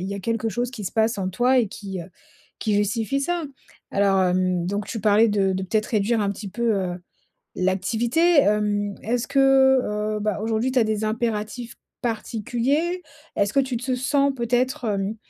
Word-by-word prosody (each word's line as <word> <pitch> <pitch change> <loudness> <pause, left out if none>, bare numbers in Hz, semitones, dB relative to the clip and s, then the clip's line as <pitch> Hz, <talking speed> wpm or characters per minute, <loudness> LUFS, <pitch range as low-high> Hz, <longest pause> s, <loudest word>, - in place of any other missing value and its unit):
il 185 - -4
y 200 - -3
a 200 - -5
quelque 225 +2 -1
chose 240 +3 -2
qui 230 -5 -7
se - - -3
passe 220 -1 +1
en 185 - -1
toi 245 +7 +2
et 230 -5 +2
qui, 195 -2 -6
heu, - - -7 0.5
qui 215 -2 0
justifie 220 +6 0
ça. 345 +3 -1 0.5
Alors, 195 -1 +2
hem, 180 -1 +1
donc 200 +2 -2
tu 225 - -5
parlais 215 +2 +4
de 200 -2 +1
de 190 0 -2
peut-être 215 +2 0
réduire 220 +1 +1
un 200 -1 +1
petit 200 +1 -6
peu, 235 +3 0
heu, 185 -2 -2 0.6
l'activité? 230 - +2
Hem, 205 -1 +1
est-ce 240 +2 -1
que, 280 0 0 0.8
heu, - - -4
bah, 210 -1 -1
aujourd'hui 225 +3 0
tu 260 - +2
as 235 - +4
des 215 0 -1
impératifs 225 +1 -3 0.3
particuliers? 245 - -1 0.3
Est-ce 200 +1 +1
que 275 - +5
tu 260 -2 -2
te 255 +2 -2
sens 280 +2 +2
peut-être, 245 +1 0
hem, 200 0 -1
220 Hz, 190 wpm, -23 LUFS, 200-245 Hz, 0.8 s, que